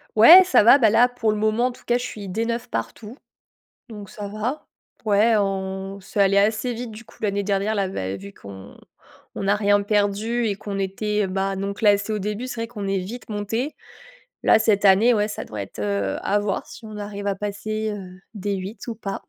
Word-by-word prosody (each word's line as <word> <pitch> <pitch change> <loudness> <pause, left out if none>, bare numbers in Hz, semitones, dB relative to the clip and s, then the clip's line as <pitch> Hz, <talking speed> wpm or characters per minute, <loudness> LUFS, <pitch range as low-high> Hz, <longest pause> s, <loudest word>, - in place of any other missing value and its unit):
Ouais, 330 +13 +10
ça 365 - +4
va! 240 +5 +8
Là, 225 -1 +5
pour 245 -3 -1
le 210 - -2
moment, 220 +3 +1
en - - -3
tout 245 - -16
cas, 240 - +2
je 245 - -5
suis 210 -5 -7
D9 230 +4 -2
partout. 210 - -5 0.7
Donc 210 -3 -9
ça 205 -1 -7
va. 215 +8 -4 0.4
Ouais, 215 +2 +4
on 195 -1 -3
c'est 200 +2 -2
allé 195 0 +4
assez 215 +4 +1
vite, 235 0 -6
du 215 +2 -11
coup, - - -20
l'année 200 -1 -1
dernière. 200 +2 0
Là, 200 -2 0 0.3
vu 100 +1 -11
qu'on 100 -1 -12 0.6
on - - -4
n'a 200 +1 +2
rien 205 -1 +3
perdu 210 +3 0
et 205 - -1
qu'on 200 -1 -5
était, 205 +1 -1
bah, 195 +1 -2
non 195 +1 -3
classés 205 0 +2
au 210 - -2
début, 210 +5 -4
c'est 240 -2 -5
vrai 230 - -3
qu'on 210 -4 -6
est 195 0 0
vite 225 +8 -8
montés. 220 +7 -3 0.7
Là, - - +5
cette 210 -2 +2
année, 200 +5 +6
ouais, 210 -2 +1
ça 210 - -5
doit 105 -2 -6
être, 100 - -9
heu, 100 -1 -1
à 205 +1 +1
voir 205 -2 -2
si 230 - -12
on 215 -1 -8
arrive 205 -1 -6
à 200 - 0
passer, 215 +2 -3
heu, 185 -3 -9 0.2
D8 200 +2 -5
ou 230 - -4
pas. 195 -2 -5
205 Hz, 210 wpm, -23 LUFS, 195-225 Hz, 0.7 s, Ouais